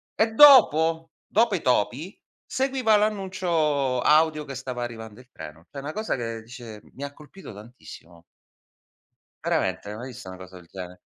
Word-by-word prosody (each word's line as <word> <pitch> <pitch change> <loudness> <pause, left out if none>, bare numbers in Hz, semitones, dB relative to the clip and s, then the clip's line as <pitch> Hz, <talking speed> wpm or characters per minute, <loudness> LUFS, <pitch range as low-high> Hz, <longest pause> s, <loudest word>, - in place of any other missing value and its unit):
E 220 0 +1
dopo 165 - +6 0.2
dopo 225 0 +2
i 180 - -1
topi, 130 - -1 0.3
seguiva 260 -4 +1
l'annuncio 175 -10 0
audio 155 0 +3
che 135 - -8
stava 125 -1 -5
arrivando 110 -2 -8
il 125 0 -18
treno. 80 +2 -11
Cioè 140 - -8
una 145 +2 -6
cosa 215 +4 -2
che 115 -2 -5
dice 115 -2 -11
mi 140 +1 -7
colpito 150 - -13
tantissimo. 100 -6 -14 1.2
Veramente, 105 - -1
mai 120 +4 -8
visto 115 -7 -10
una 95 - -9
cosa 95 0 -13
del 85 -2 -14
genere. 90 -1 -10
135 Hz, 150 wpm, -24 LUFS, 110-180 Hz, 1.2 s, dopo